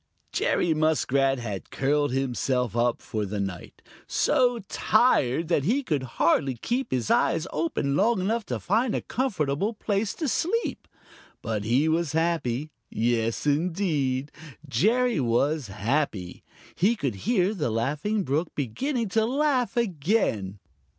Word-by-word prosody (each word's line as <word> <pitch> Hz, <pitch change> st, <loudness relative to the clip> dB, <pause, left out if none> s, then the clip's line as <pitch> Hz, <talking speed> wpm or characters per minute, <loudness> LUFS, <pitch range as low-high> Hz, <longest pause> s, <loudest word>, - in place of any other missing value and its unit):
Jerry 170 Hz, -, +1 dB
Muskrat 140 Hz, -3 st, +2 dB
had 105 Hz, -6 st, -5 dB
curled 145 Hz, +1 st, +1 dB
himself 125 Hz, -3 st, -1 dB
up 120 Hz, 0 st, +1 dB
for 110 Hz, -4 st, -3 dB
the 100 Hz, +1 st, -3 dB
night, 95 Hz, -3 st, -6 dB, 0.2 s
so 245 Hz, -1 st, +2 dB
tired 165 Hz, -, +2 dB
that 155 Hz, -5 st, +2 dB
he 250 Hz, -, +1 dB
could 150 Hz, -, -1 dB, 0.2 s
hardly 140 Hz, -6 st, +2 dB
keep 245 Hz, -, -2 dB
his 125 Hz, -4 st, -1 dB
eyes 165 Hz, 0 st, +2 dB
open 150 Hz, -3 st, -1 dB
long 220 Hz, +5 st, +3 dB
enough 220 Hz, +5 st, 0 dB
to -, -, -2 dB
find 220 Hz, +6 st, +1 dB
a -, -, -1 dB
comfortable 205 Hz, -, -1 dB
place 205 Hz, 0 st, -1 dB
to 315 Hz, -, -2 dB
sleep. 375 Hz, -, -1 dB, 0.6 s
But 110 Hz, -2 st, -2 dB
he 130 Hz, +7 st, +2 dB
was 160 Hz, -2 st, 0 dB
happy. 155 Hz, -4 st, 0 dB, 0.2 s
Yes, 115 Hz, +1 st, 0 dB
indeed, 150 Hz, -4 st, 0 dB, 0.4 s
Jerry 225 Hz, -, +2 dB
was 135 Hz, +3 st, +1 dB
happy. 105 Hz, -2 st, -2 dB, 0.3 s
He 210 Hz, +7 st, +2 dB
could 140 Hz, -, -2 dB, 0.2 s
hear 200 Hz, -4 st, +2 dB
the 150 Hz, -, -1 dB
Laughing 145 Hz, -, -1 dB
Brook 155 Hz, +3 st, 0 dB
beginning 230 Hz, -, -2 dB
to 220 Hz, +3 st, +2 dB
laugh 265 Hz, -2 st, +1 dB
again. 160 Hz, -, 0 dB
150 Hz, 135 wpm, -26 LUFS, 125-210 Hz, 0.6 s, long